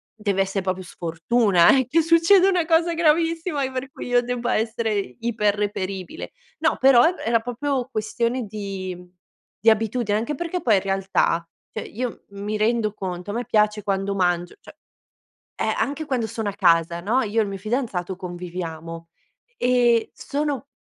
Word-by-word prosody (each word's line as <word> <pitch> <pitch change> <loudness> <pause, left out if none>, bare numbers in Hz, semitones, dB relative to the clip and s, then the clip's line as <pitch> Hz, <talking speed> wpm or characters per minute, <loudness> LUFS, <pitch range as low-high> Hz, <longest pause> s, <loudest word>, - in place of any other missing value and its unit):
deve 200 -3 0
essè 195 +1 -2
proprio 185 0 -2
sfortuna 175 +4 +3
eh, 260 -3 +1
che 330 +5 +4
succeda 335 +4 +5
una 360 -4 +1
cosa 335 +1 +3
gravissima 325 -2 +1
per 260 +1 -5
cui - - -8
io 245 0 +3
debba 245 0 -1
essere 225 0 -1 0.3
iper 215 -3 0
reperibile. 195 - -4 0.3
No - - +1
però 260 -2 +6
er 350 +2 +2
era 230 0 +3
proprio 255 +2 -2
questione 235 +2 -1
di 195 -3 -5 0.6
di 225 - +5
abitudine 220 -1 +1
anche 235 +7 -2
perché 345 +4 -3
poi 220 -4 +4
in 190 - +2
realtà, 195 -3 0 0.3
cioè 220 - -5
io 240 +2 -5
mi 205 +2 -4
rendo 215 0 +1
conto, 185 -1 -5
a - - -5
me 240 +1 -2
piace 210 0 +2
quando 195 0 -1
mangio 175 -2 0
cioè - - -14 0.8
eh, - - 0
anche 290 +3 -2
quando 250 -6 -1
sono 220 -1 -3
a - - -5
casa, 170 -3 +3
no, 225 +8 +1
io 220 +1 -1
e - - +3
il - - -4
mio 195 - -5
fidanzato 215 -5 -2
conviviamo, 170 -2 -7 0.5
ehm, 245 -2 +3
sono 285 -2 -3
220 Hz, 165 wpm, -23 LUFS, 195-255 Hz, 0.8 s, però